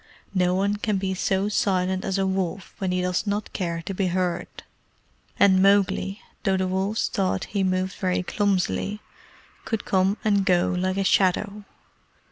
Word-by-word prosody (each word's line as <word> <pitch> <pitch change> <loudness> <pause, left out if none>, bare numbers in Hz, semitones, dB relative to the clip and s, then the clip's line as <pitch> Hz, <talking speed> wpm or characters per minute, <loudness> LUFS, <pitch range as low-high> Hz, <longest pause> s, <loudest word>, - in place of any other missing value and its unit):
No 180 -1 +2
one 200 +2 +1
can 210 -1 -1
be 190 0 -1
so 190 +1 0
silent 190 -4 0
as 195 - -1
a 195 - +1
wolf 190 0 -2
when 190 -2 -1
he 180 0 0
does 180 +3 -1
not 205 +1 -2
care 170 -3 -3
to 195 - -4
be 190 0 0
heard; 180 -1 -1 0.9
and 190 -1 +5
Mowgli, 195 0 +2 0.2
though 195 -3 +2
the 185 0 0
wolves 190 +4 0
thought 190 -1 -1
he 200 -2 -2
moved 185 0 0
very 185 -1 -1
clumsily, 200 +1 0 0.6
could 225 -3 -3
come 190 +2 +2
and 205 -2 +3
go 180 -1 +2
like 185 +1 -1
a 195 - +1
shadow. 200 +2 +1
190 Hz, 165 wpm, -24 LUFS, 185-200 Hz, 0.9 s, and